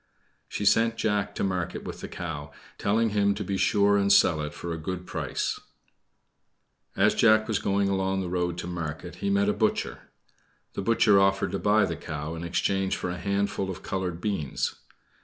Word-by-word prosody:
She 105 - -4
sent 115 +3 +3
Jack 105 -2 0
to - - -2
market 90 -3 -2
with - - -7
the - - -5
cow, 75 -4 -6 0.3
telling 110 +3 +2
him 100 -1 +2
to 105 - -3
be 100 +1 -2
sure 100 +1 +3
and 100 0 +2
sell 80 -5 +5
it 75 0 -4
for 85 +2 -5
a - - -4
good 90 +3 -5
price. - - -3 1.4
As - - +4
Jack 110 -1 +4
was 110 -3 0
going 100 0 +1
along 95 0 0
the 90 - -3
road 90 0 -1
to - - -4
market 85 0 -5
he 100 - -2
met 100 0 +2
a 105 - +3
butcher. - - -1 0.6
The - - -3
butcher 105 -1 +4
offered 95 0 +2
to - - -2
buy 105 0 +3
the 85 -4 -4
cow 75 0 -5
in 85 0 -6
exchange 95 +3 0
for 90 - -3
a 90 - -4
hatful 100 +1 -1
of 95 - -6
colored 90 -3 -3
beans. 95 - -2
95 Hz, 190 wpm, -27 LUFS, 85-100 Hz, 1.4 s, sell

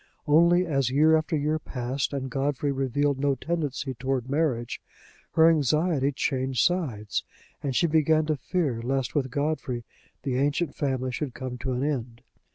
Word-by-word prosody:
Only 170 +4 +5
as 135 -6 +1
year 155 +4 +5
after 155 0 0
year 150 +2 0
passed 130 -1 -3
and 135 -2 -4
Godfrey 140 +1 0
revealed 135 +1 0
no 140 0 +2
tendency 145 -2 -2
toward 130 +1 -2
marriage, 130 -6 0 0.5
her 160 0 +6
anxiety 150 -1 +2
changed 130 -3 0
sides, 130 - -1 0.4
and 135 -3 -2
she 170 - +3
began 155 -1 +3
to 155 0 +1
fear 140 -4 -1
lest 130 +1 -1
with 135 -3 0
Godfrey 140 -3 -2 0.4
the 130 -3 -1
ancient 145 +4 0
family 130 -2 -1
should 130 -1 -4
come 125 -1 -5
to 130 +2 -2
an 125 +2 -1
end. 125 -5 -3
140 Hz, 160 wpm, -26 LUFS, 130-155 Hz, 0.5 s, her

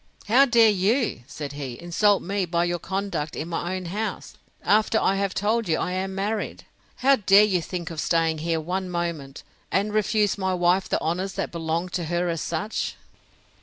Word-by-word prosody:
—How 255 +6 +6
dare 230 -4 +5
you, 210 - +1
said 145 -2 -6
he, 135 -4 -6
insult 195 +4 +2
me 195 +1 -1
by 170 0 +1
your 175 0 -1
conduct 190 -6 -3
in 155 - -4
my 175 +2 -2
own 185 -1 -5
house, 205 +4 -4 0.3
after 215 +2 +3
I 195 - +2
have 195 -1 -1
told 215 +1 0
you 160 - +2
I - - -2
am 190 +1 -3
married? 205 +2 -3 0.4
How 275 0 +6
dare 200 -1 +6
you 190 -4 +2
think 175 0 -5
of 160 - -4
staying 165 -2 +1
here 165 +1 -1
one 180 +3 -3
moment, 170 -6 -4 0.3
and 205 +3 0
refuse 210 -1 +1
my 190 -1 0
wife 180 +2 +2
the - - +1
honours 180 +4 -2
that - - -3
belong 165 +1 -2
to 175 -1 -3
her 175 +2 -1
as 165 -2 -2
such? 205 +6 -3
185 Hz, 190 wpm, -25 LUFS, 170-205 Hz, 0.4 s, How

